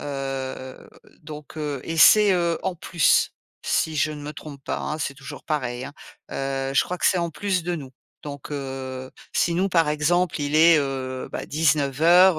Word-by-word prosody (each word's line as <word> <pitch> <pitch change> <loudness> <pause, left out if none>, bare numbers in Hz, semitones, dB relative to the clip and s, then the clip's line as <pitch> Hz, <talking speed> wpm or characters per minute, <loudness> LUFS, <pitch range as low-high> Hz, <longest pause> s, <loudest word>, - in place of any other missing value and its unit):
Heu, 135 -2 -5 0.3
donc 150 0 -10
heu 145 -3 -3
et 165 - -4
c'est, 210 +4 +7
heu, 170 -2 +1
en 185 - -1
plus, 170 -1 +2 0.3
si 160 - 0
je 155 +2 +2
ne 150 -1 -8
me 150 +1 -6
trompe 145 -2 -10
pas, - - -2
hein. 155 +1 -3
C'est 140 -2 -3
toujours 135 0 -10
pareil, 125 -5 -2
hein. - - -8 0.4
Heu, 135 0 -2
je - - +5
crois 180 - -4
que - - +2
c'est 185 - +3
en 170 -1 -1
plus 185 +1 -1
de 175 0 -1
nous. 135 -5 -8 0.3
Donc 145 -1 -8
heu, 130 -2 -5 0.2
si 170 - +2
nous, 185 +3 +1
par 165 -4 +3
exemple, 155 +3 +1
il 145 +1 0
est 165 0 +7
heu, 130 -2 -3
bah - - -4
19:00, 160 +4 +4
150 Hz, 190 wpm, -24 LUFS, 135-170 Hz, 0.4 s, c'est